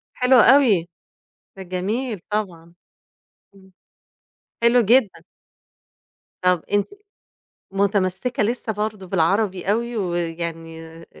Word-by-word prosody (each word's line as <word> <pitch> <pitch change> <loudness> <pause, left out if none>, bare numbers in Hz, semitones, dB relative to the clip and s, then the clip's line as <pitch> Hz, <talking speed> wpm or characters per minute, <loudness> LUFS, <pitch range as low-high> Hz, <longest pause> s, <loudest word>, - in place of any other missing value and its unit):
حلو 250 +1 +3
أوي 225 -9 +5 0.7
ده 190 - -8
جميل 200 +5 -3
طبعًا 175 -5 -4 0.8
إمم 190 -1 -20 0.9
حلو 235 +1 +5
جدًا. 225 -5 +2 1.2
طبَ 180 -2 +2
أنتِ 205 0 +1 0.8
متمسكة 200 +3 0
لسّة 230 +1 -2
برضه 210 -1 -4
بالعربي 190 +2 0
أوي 235 +2 -2
ويعني 165 -3 -4
آآ 165 +1 -13
195 Hz, 90 wpm, -21 LUFS, 175-220 Hz, 1.2 s, أوي